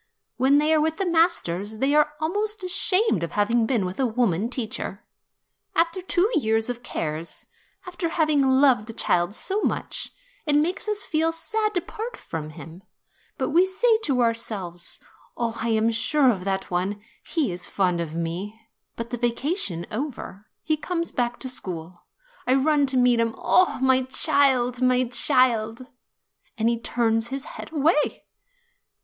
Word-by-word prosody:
When 265 +3 +4
they 305 +2 +3
are 310 - +4
with 320 +1 0
the 390 - -1
masters, 270 - +1
they 270 +5 +1
are 300 0 +3
almost 415 +6 -1
ashamed 365 - +1
of 170 - -4
having 225 +2 +2
been 230 -7 +1
with 180 +5 -5
a 265 - +3
woman 225 -3 0
teacher. 220 -4 -5 0.7
After 335 +3 +1
two 365 +1 +2
years 225 - +1
of 245 0 -8
cares, 160 -5 -5 0.4
after 355 -1 -3
having 310 -3 +2
loved 260 -4 +4
a - - -5
child 175 -1 0
so 400 - -1
much, - - -2 0.4
it 295 - +3
makes 330 +8 0
us 420 0 +2
feel 320 +1 +1
sad 425 +6 -2
to 355 - +2
part 440 +7 -7
from 155 -2 -6
him; 165 +3 -11 0.6
but - - -1
we 340 +4 +5
say 440 +4 +2
to 260 -3 +1
ourselves, 200 -7 -3 0.4
'Oh, 230 -1 -1
I 230 - -1
am 220 0 +2
sure 255 +4 +3
of 190 -4 -4
that 190 -1 -2
one; 185 +4 -1 0.2
he 305 - -1
is 175 0 -4
fond 180 -3 0
of 160 -1 -5
me.' 175 +6 -4 0.4
But 230 +1 -6
the 245 - -3
vacation 240 - 0
over, 215 -5 -5 0.2
he 310 -1 +1
comes 335 +2 -3
back 240 -1 -1
to 260 - -4
school. 175 -8 -7 0.4
I 255 - +4
run 285 +1 +3
to 260 -1 0
meet 245 -1 +4
him; 230 -1 0
'Oh, 370 - +3
my 260 0 +3
child, 260 -3 +2
my 255 0 +3
child 245 -2 +1 0.3
!' - - -43
And 225 +1 +2
he 235 -1 0
turns 225 -1 0
his 270 +2 -5
head - - -9
away." 300 0 +1
250 Hz, 165 wpm, -24 LUFS, 215-310 Hz, 0.7 s, we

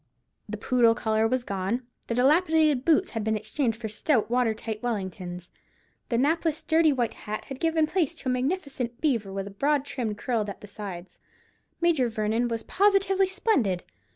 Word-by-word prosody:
The 215 - -4
poodle 235 +1 +3
collar 220 -1 +1
was 255 +1 0
gone: 200 +4 -2 0.2
the 230 - -1
dilapidated 305 +1 +3
boots 335 +4 +3
had 225 -2 -3
been 220 0 +1
exchanged 220 +2 -2
for 225 - -4
stout 225 +2 0
water 245 -3 +2
tight 215 -1 -5
Wellingtons: 185 -6 -4 0.6
the 235 - +1
napless 315 +4 +1
dirty 320 -1 +4
white 245 -4 0
hat 215 0 -6
had 270 -1 -8
given 325 -1 +2
place 330 -2 0
to - - -8
a - - +2
magnificent 260 -3 -2
beaver, 230 -10 0
with 195 0 -3
a 200 - -8
broad 280 +7 +1
trim 240 -7 -3
curled 220 -2 -1
at 200 - -8
the 210 - -10
sides. 195 -3 -8 0.6
Major 315 -8 +3
Vernon 220 +2 0
was 230 -1 -3
positively 390 -1 +3
splendid. 370 - +1
245 Hz, 175 wpm, -27 LUFS, 215-305 Hz, 0.6 s, dirty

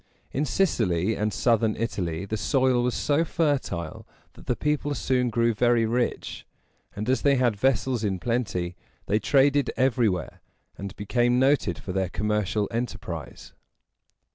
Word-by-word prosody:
In 145 +3 -1
Sicily 110 - +1
and 105 0 -1
southern 110 +1 +2
Italy 95 -6 -3
the 105 - -3
soil 130 +4 +2
was 125 0 0
so 150 +3 +1
fertile 140 - -2 0.3
that - - -16
the 125 - +1
people 150 0 -1
soon 125 -2 +1
grew 115 0 +2
very 120 +1 +3
rich; 120 +2 -2 0.5
and, 105 +2 -4
as 130 +1 +2
they 140 -1 +4
had 125 -4 +2
vessels 125 +1 +1
in 100 -3 0
plenty, 100 -5 -2 0.3
they 105 - +1
traded 140 +5 +3
everywhere, 120 -7 0 0.3
and 100 0 -7
became 120 +4 +1
noted 130 - +2
for 95 - -6
their 95 -2 0
commercial 105 0 -1
enterprise. 100 - -5
115 Hz, 140 wpm, -26 LUFS, 100-130 Hz, 0.5 s, they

